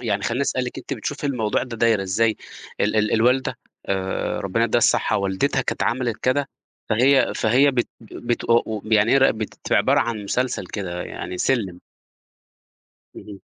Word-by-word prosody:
يعني 100 -3 -1
خلّيني 120 +4 -1
أسأل 130 -2 -1
لِك، 125 - -6
أنتِ - - -7
بتشوفي 145 +5 -5
الموضوع 115 -6 0
ده 120 -3 -6
دايرة 110 -3 +2
إزاي 110 +4 +1 0.4
ال 105 +2 +1
ال 105 0 +2
الوالدة 125 +4 +2 0.3
آآ 95 -1 -2
ربّنا - - 0
يدّيها - - +2
الصحّة - - +2
والدتها 100 +8 0
كانت - - -2
عملت 120 -2 0
كده، 135 +2 +1 0.4
فهي 130 +5 +4
فهي 130 +6 +3
بت 125 -2 -1
آآ - - -15
بت 120 0 -2
آآ 115 0 +4
وب 110 0 -5
يعني 105 +3 +4
هي 135 - +6
راقبت 110 -5 +1
في - - +2
عبارة - - +3
عن 110 -3 -2
مسلسل 125 -3 -1
كده، 90 -4 -5
يعني 90 - -6
سِلّم؟ 100 -9 0 1.4
اهم. 100 -2 -10
115 Hz, 175 wpm, -22 LUFS, 105-130 Hz, 1.4 s, هي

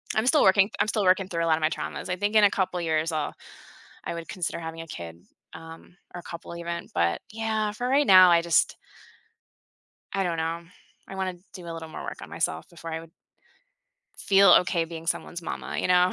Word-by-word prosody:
I'm 220 - +1
still 300 +3 +5
working 195 +1 +5
I'm 205 - +2
still 210 -1 0
working 185 0 +3
through 170 -3 -2
a 165 - 0
lot 160 -1 +3
of - - -7
my 155 - +3
traumas; - - -5
I 180 - 0
think 205 +3 -2
in 215 - +6
a 205 - +6
couple 185 -2 -1
of 170 - -3
years, 160 +1 0
I'll 155 -1 -2 0.7
I - - -4
would 170 0 -7
consider 175 -2 -4
having 165 0 -6
a 165 - -10
kid, 85 - -9 0.3
um, 165 +2 -12 0.2
or 175 - -6
a - - -12
couple 170 0 -8
even, 170 0 -5
but 85 0 +1
yeah, 220 -1 -1
for 245 +4 -4
right 280 +1 +3
now, 185 -2 +9
I 170 0 +5
just 170 -3 +2 1.4
I 195 -1 0
don't 170 -2 -1
know, 165 +1 -2 0.4
I - - -9
wanna 190 -1 -2 0.2
do 180 -3 -9
a - - -4
little 165 -1 -7
more - - -8
work - - -7
on - - -9
myself 80 - -3
before 165 -1 -9
I 160 - -2
would 165 0 -14 1.1
feel 195 -2 +6
okay 175 -2 -1
being 165 0 -9
someone's 175 +1 -3
mama, 165 - -5
you - - -1
know? 180 0 +4
170 Hz, 225 wpm, -26 LUFS, 165-195 Hz, 1.4 s, now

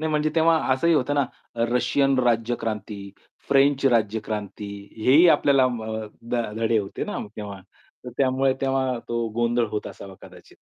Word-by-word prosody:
नाही 160 0 -1
म्हणजे 150 0 +1
तेव्हा 165 0 +4 0.2
असंही 165 +6 +2
होतं 145 -1 +1
ना, 145 - +3 0.3
अ, 115 - -5
रशियन 135 +2 +2
राज्यक्रांती, 115 -3 -1 0.5
फ्रेंच 140 0 +3
राज्यक्रांती, 105 -3 -1 0.4
हेही 150 +7 +6
आपल्याला 140 -3 +4
म 115 -3 -5 0.5
ध - - 0 0.2
धडे 115 0 +1
होते 100 -2 -4
ना - - -4 0.2
तेव्हा. 100 -2 -7 0.4
तर 125 - -7
त्यामुळे 135 0 +2
तेव्हा 135 -2 0
तो 120 0 -1
गोंधळ 120 0 +2
होत 105 - -4
असावा 95 -1 -10
कदाचित. - - -15
125 Hz, 155 wpm, -24 LUFS, 110-140 Hz, 0.5 s, हेही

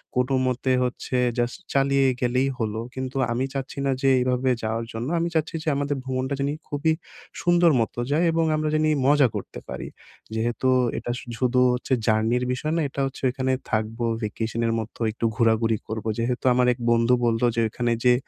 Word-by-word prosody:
কোন 125 +1 +1 0.2
মতে 130 +1 0
হচ্ছে 125 +1 -2 0.2
জাস্ট 120 +9 -1
চালিয়ে 135 0 +3
গেলেই 125 +2 +2
হলো। 110 -1 -2
কিন্তু 130 0 -4
আমি 125 +3 0
চাচ্ছি 135 0 -5
না 135 - +2
যে 135 - +4
এইভাবে 125 +1 +1
যাওয়ার 115 +1 -2
জন্য। 115 +3 -4
আমি 170 - 0
চাচ্ছি 160 +1 0
যে - - -12
আমাদের 145 +1 -1
ভ্রমণটা 130 +1 -2
জানি 140 +1 0 0.2
খুবই 155 +2 +1 0.5
সুন্দর 175 -1 +4
মত 110 - -2 0.2
যায় 160 +4 +3
এবং 165 0 +1
আমরা 155 0 0
জানি 155 0 +2 0.2
মজা 145 -2 +5
করতে - - -6
পারি। - - -5 0.5
যেহেতু 120 +3 0 0.3
এটা 120 - -3
শু - - -12
শুধু 125 0 +2
হচ্ছে 125 +2 -2
জার্নির 110 +3 +2
বিষয় 155 +5 -2
না, 165 - +1
এটা 140 - -4
হচ্ছে 135 - -6
ওইখানে 130 +1 -1 0.2
থাকবো 110 +2 -1 0.2
ভ্যাকেশনের 115 +2 -1
মতো 110 +2 -7
একটু 115 - -3
ঘোরাঘুরি 115 -1 +2
করবো 110 0 -3
যেহেতু 125 +2 -1
আমার 125 0 +3
এক 120 - -15
বন্ধু 115 +1 +3
বললো 115 +1 +2
যে 115 - 0
ওইখানে 120 +2 -1
যে 125 - +7
125 Hz, 185 wpm, -24 LUFS, 115-140 Hz, 0.5 s, যে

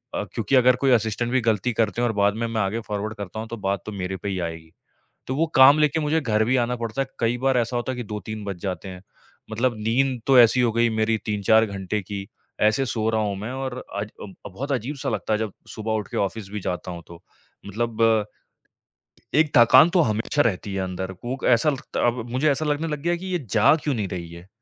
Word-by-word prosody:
अ, - - -1
क्योंकि 115 +3 0
अगर 125 0 +5
कोई 135 - +4
असिस्टेंट 120 +1 +1
भी 130 - +2
गलती 110 +3 0
करते 110 +1 0
हैं 120 - +2
और 110 - -3
बाद 100 0 +2
में 115 +1 -2
मैं 115 -1 -1
आगे 100 +4 -1
फ़ॉरवर्ड 105 +1 -4
करता 100 +1 -6
हूँ 110 - -5
तो 115 - -5
बात 100 -2 -1
तो 110 - -5
मेरे 95 -1 -4
पे 100 - -5
ही 95 -1 -2
आएगी। 80 0 -11 0.6
तो 130 - -2
वो 165 +4 +1
काम 135 +3 +8
लेके 150 +1 +2
मुझे 155 +2 +1
घर 110 -4 +1
भी 130 +3 +2
आना 125 - -2
पड़ता 115 +3 -3
है। 135 - -2
कई 115 +1 +1
बार 135 0 +2
ऐसा 120 +1 0
होता 120 +2 -2
है - - -8
कि 125 - -4
2-3 105 0 -6
बज 100 -3 -4
जाते 95 0 -4
हैं। 90 -1 -9 0.5
मतलब 120 +3 +1
नींद 120 +3 0
तो 135 -2 +6
ऐसी 120 +1 +6
हो 120 -2 +2
गई 115 +1 +3
मेरी 110 0 +1
3-4 110 +2 +3
घंटे 100 0 -3
की। 100 0 -6 0.4
ऐसे 110 +5 +3
सो 110 -3 -1
रहा 110 -1 +1
हूँ 100 -2 -1
मैं 105 +5 -5
और 130 -1 -4 0.2
अज 100 +1 -3
अ, 100 0 -11
बहुत 135 +10 -5
अजीब-सा 135 +2 -2
लगता 110 -1 -2
है 105 - +1
जब 110 -3 -3 0.2
सुबह 110 0 -4
उठ 105 -3 -2
के - - -3
ऑफ़िस 100 0 -2
भी 105 - -4
जाता 90 0 -4
हूँ 85 -1 -7
तो। 85 0 -13 0.5
मतलब 115 0 +1 1.1
एक 155 -1 +3
थकान 130 +6 +7
तो 175 0 +3
हमेशा 110 +3 0
रहती 100 -4 -1
है 95 - -1
अंदर। 95 0 -4
कूक 125 +8 -6
ऐसा 135 +7 +1
लगता 135 -4 -2
अब 120 -1 -2
मुझे 130 +5 +1
ऐसा 155 +3 -1
लगने 150 +2 -1
लग 150 -2 -4
गया 175 +3 +1
कि 180 - -9
ये 185 -2 -1
जा 120 +7 +5
क्यों 145 - 0
नहीं 105 -4 -2
रही 85 -2 -6
है। 85 +2 -12
110 Hz, 240 wpm, -23 LUFS, 100-130 Hz, 1.1 s, काम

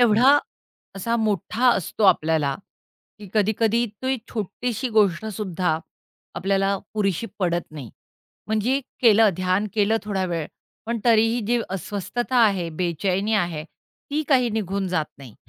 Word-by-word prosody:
एवढा 240 +4 +6 0.6
असा 230 +5 -1
मोठा 220 +3 +1
असतो 205 +3 -1
आपल्याला, 155 -6 +3 0.6
की 205 -2 -11
कधी-कधी 220 +2 +2 0.2
ती 260 0 +1
छोटीशी 235 +4 -3
गोष्टसुद्धा 185 -4 +1 0.6
आपल्याला 195 +1 +1 0.2
पुरेशी 200 +1 0
पडत 175 -2 0
नाही. 140 -7 -9 0.6
म्हणजे 220 +6 +1 0.2
केलं 220 -3 +6
ध्यान 185 +3 +1
केलं 215 +1 +2
थोडा 195 -3 -1
वेळ, 165 -3 -2 0.4
पण 235 0 -1
तरीही 225 +1 +4
जी 240 0 +2
अस्वस्थता 205 +7 -3
आहे, 190 -5 +1
बेचैनी 185 +5 -1
आहे, 170 -6 -1
ती 295 - -7
काही 250 -4 +3
निघून 200 -3 -2
जात 160 -4 0
नाही. 130 -6 -12
205 Hz, 125 wpm, -23 LUFS, 180-225 Hz, 0.6 s, एवढा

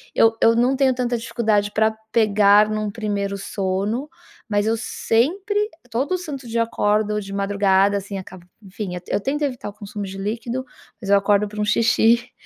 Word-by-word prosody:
eu 225 0 +4
eu 230 - +5
não 245 +3 +2
tenho 270 -1 +3
tanta 245 -1 -1
dificuldade 220 -3 0
pra 220 +1 +2 0.2
pegar 210 -1 +5
no 215 -1 -2
primeiro 200 -2 -3
sono, 200 +7 -2 0.4
mas 205 0 +1
eu 225 - +2
sempre 385 - 0 0.2
todo 275 +10 0
santo 285 -7 -7
dia, 230 0 0
eu - - +4
acordo 210 -1 0
ou - - 0
de 195 0 -9
madrugada, 200 0 +2
assim, 200 0 -5
acaba 185 -1 -10 0.2
enfim, 195 0 -6 0.2
eu 200 - 0
tento 295 +6 -2
evitar 255 -7 -3
o - - -11
consumo 205 0 -7
de 195 0 -7
líquido, 235 +5 -3 0.4
mas 195 - -6
eu 200 - +7
acordo 205 +1 +2
pra 210 +1 -5
um - - +1
xixi 230 +2 +3
215 Hz, 185 wpm, -21 LUFS, 200-235 Hz, 0.4 s, eu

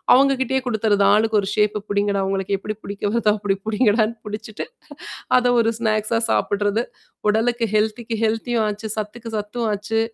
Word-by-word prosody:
அவங்க 275 +1 +4
கிட்டயே 265 +1 +1
குடுத்துறது. 215 -3 +2
ஆளுக்கு 215 0 +3
ஒரு 195 - -4
ஷேப்பு 210 -1 +1
புடிங்கடா, 200 -1 +1
உங்களுக்கு 195 0 -1
எப்டி 215 +2 -5
பிடிக்க 200 0 -7
வருதா 225 -3 +3
அப்டி 200 -1 0
புடிங்கடான்னு 220 0 +2
புடிச்சுட்டு, 210 0 -6 0.7
அத 245 0 +2
ஒரு 225 0 +2
ஸ்நாக்ஸா 215 0 +1
சாப்பிடறது. 205 +2 +1 0.5
உடலுக்கு 230 +2 +1
ஹெல்த்திக்கு 220 +2 0
ஹெல்த்தியும் 225 +1 0
ஆச்சு, 210 +1 -4
சத்துக்கு 225 +2 -5
சத்தும் 215 +3 -3
ஆச்சு, 210 +2 -1
215 Hz, 150 wpm, -21 LUFS, 205-230 Hz, 0.7 s, அவங்க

